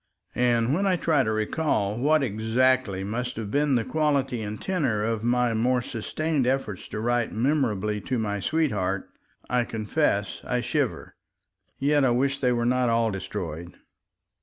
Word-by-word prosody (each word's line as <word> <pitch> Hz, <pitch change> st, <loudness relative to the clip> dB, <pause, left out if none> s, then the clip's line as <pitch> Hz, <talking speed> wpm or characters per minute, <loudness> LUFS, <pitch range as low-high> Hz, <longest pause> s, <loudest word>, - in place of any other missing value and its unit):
And 120 Hz, 0 st, +2 dB
when 195 Hz, +5 st, +1 dB
I 185 Hz, -, +3 dB
try 160 Hz, -4 st, +2 dB
to 110 Hz, -4 st, 0 dB
recall 110 Hz, -1 st, 0 dB
what 145 Hz, +5 st, +2 dB
exactly 110 Hz, -2 st, +1 dB
must 125 Hz, +5 st, -3 dB
have 110 Hz, -2 st, -5 dB
been 145 Hz, -1 st, +2 dB
the 115 Hz, -2 st, +1 dB
quality 140 Hz, -6 st, 0 dB
and 105 Hz, 0 st, -5 dB
tenor 140 Hz, -, 0 dB
of 115 Hz, 0 st, -1 dB
my 120 Hz, 0 st, +2 dB
more 125 Hz, +2 st, +1 dB
sustained 140 Hz, +4 st, -2 dB
efforts 130 Hz, -7 st, -2 dB
to -, -, -5 dB
write 120 Hz, 0 st, 0 dB
memorably 110 Hz, -5 st, 0 dB
to 130 Hz, +5 st, -2 dB
my 105 Hz, -2 st, -1 dB
sweetheart, 105 Hz, -, -1 dB, 0.4 s
I 125 Hz, 0 st, +1 dB
confess 110 Hz, -1 st, -1 dB
I 125 Hz, 0 st, -1 dB
shiver... 125 Hz, +1 st, -2 dB, 0.6 s
Yet 145 Hz, +1 st, +2 dB
I 130 Hz, -, +4 dB
wish 135 Hz, +3 st, +1 dB
they 125 Hz, -2 st, +2 dB
were 120 Hz, -1 st, 0 dB
not 125 Hz, 0 st, +2 dB
all 115 Hz, -1 st, +2 dB
destroyed. 90 Hz, -4 st, -6 dB
120 Hz, 160 wpm, -26 LUFS, 110-135 Hz, 0.6 s, I